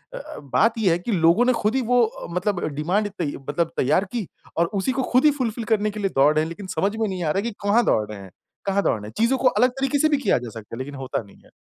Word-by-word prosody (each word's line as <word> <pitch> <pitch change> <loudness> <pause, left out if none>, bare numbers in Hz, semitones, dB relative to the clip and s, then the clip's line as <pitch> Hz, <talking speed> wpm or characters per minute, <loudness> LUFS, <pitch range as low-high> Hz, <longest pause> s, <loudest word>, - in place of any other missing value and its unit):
अ - - -5
अ, - - -9
बात 220 - +1
ये 195 -5 +3
है 170 - +1
कि 205 +7 -4
लोगों 175 +5 +4
ने 255 - +4
खुद 225 0 0
ही 265 - +2
वो 245 +1 +3
अ, 220 - -8
मतलब 180 0 -1
डिमांड 180 +8 0
तै 170 - 0 0.2
मतलब 165 +3 0
तैयार 155 +9 +2
की 225 -7 -2 0.3
और 170 - +4
उसी 200 +5 0
को 260 0 -1
खुद 255 +4 +4
ही 300 - +7
फुलफिल 235 -2 -2
करने 210 0 +1
के 210 - -7
लिए 195 -1 0
दौड़ 140 +3 +5
रहे 155 - +3
हैं। 160 - -4
लेकिन 190 +4 -8
समझ 205 +2 +1
में 220 -1 0
नहीं 185 -3 -3
आ 155 - +1
रहा 195 - 0
कि 235 +3 -3
कहाँ 225 +4 +4
दौड़ 105 - +2
रहे 105 - -7
हैं 95 -1 -12 0.3
कहाँ 200 0 +1
दौड़ 110 - +1
रहे 105 - -9
हैं? 110 - -11
चीज़ों 235 +4 +3
को 260 - +2
अलग 250 0 +4
तरीके 270 +2 +1
से 310 - +4
भी 295 - +3
किया 265 -8 +2
जा 120 -1 -6
सकता 110 0 -9
है - - -8
लेकिन 140 +1 -9
होता 135 -2 -3
नहीं 100 - -18
है। - - -20
200 Hz, 305 wpm, -23 LUFS, 155-235 Hz, 0.3 s, ही